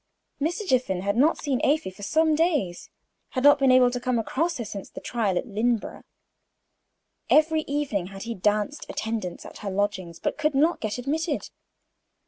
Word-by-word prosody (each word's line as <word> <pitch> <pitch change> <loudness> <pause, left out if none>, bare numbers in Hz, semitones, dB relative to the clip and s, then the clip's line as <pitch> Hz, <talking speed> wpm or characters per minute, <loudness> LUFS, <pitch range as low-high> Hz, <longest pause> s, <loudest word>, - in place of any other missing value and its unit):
Mr. 350 +7 -1
Jiffin 245 - +1
had 200 +1 0
not 290 +7 +4
seen 275 -4 -1
Afy 280 -10 +2
for 190 +2 -15
some 315 +9 +2
days 300 - 0 0.5
had 255 - +1
never 290 0 +8
been 270 -2 +4
able 255 -1 +6
to 245 - -3
come 250 0 0
across 325 +9 -1
her 235 - -4
since 200 -1 -7
the - - -9
trial 215 -6 -1
at - - -1
Lynneborough. 230 0 -1 1.3
Every 315 +1 +4
evening 275 -11 -1
had 195 0 -8
he 235 0 -4
danced 210 +7 -1
attendance 220 -5 -4
at - - -10
her 205 - -4
lodgings, 190 -3 -2
but - - -2
could 305 -2 +1
not 315 +5 +2
get 215 0 -2
admitted. 295 +5 -2
245 Hz, 175 wpm, -25 LUFS, 205-295 Hz, 1.3 s, never